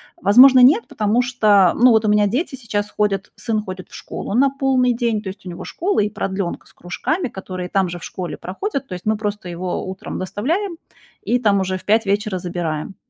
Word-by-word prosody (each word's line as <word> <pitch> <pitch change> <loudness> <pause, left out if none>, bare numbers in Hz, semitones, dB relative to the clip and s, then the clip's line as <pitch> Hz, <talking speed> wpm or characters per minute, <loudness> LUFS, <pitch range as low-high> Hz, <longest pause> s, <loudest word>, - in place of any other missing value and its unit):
Возможно, 255 -2 +7
нет, 300 - +5
потому 215 +3 +1
что, 210 -7 +4
ну, 250 +1 +5
вот 220 -1 +3
у - - +2
меня 210 0 +4
дети 265 - -2
сейчас 215 -4 -3
ходят, 205 -2 -1
сын 225 -3 -2
ходит 185 -2 -8
в - - -21
школу - - -6
на 275 +3 +4
полный 265 -2 +1
день. 230 -3 -1
То 200 - -9
есть 190 - -11
у 180 - -6
него 170 - -8
школа 385 - -1
и 210 0 +1
продлёнка 190 -3 -4
с - - -21
кружками, 265 - -3
которые 185 -3 -6
там 190 -2 +1
же 175 0 -6
в - - -14
школе 180 -2 -6
проходят. 275 - -4
То 185 - -7
есть 180 - -10
мы 215 0 +1
просто 205 -3 -4
его 180 +1 -4
утром 190 0 -6
доставляем 325 - -2 0.5
и 245 - +1
там 205 -4 +2
уже 185 0 -2
в - - -14
5 220 +1 +3
вечера 200 -1 0
забираем. 175 -1 -4
210 Hz, 215 wpm, -20 LUFS, 190-250 Hz, 0.5 s, Возможно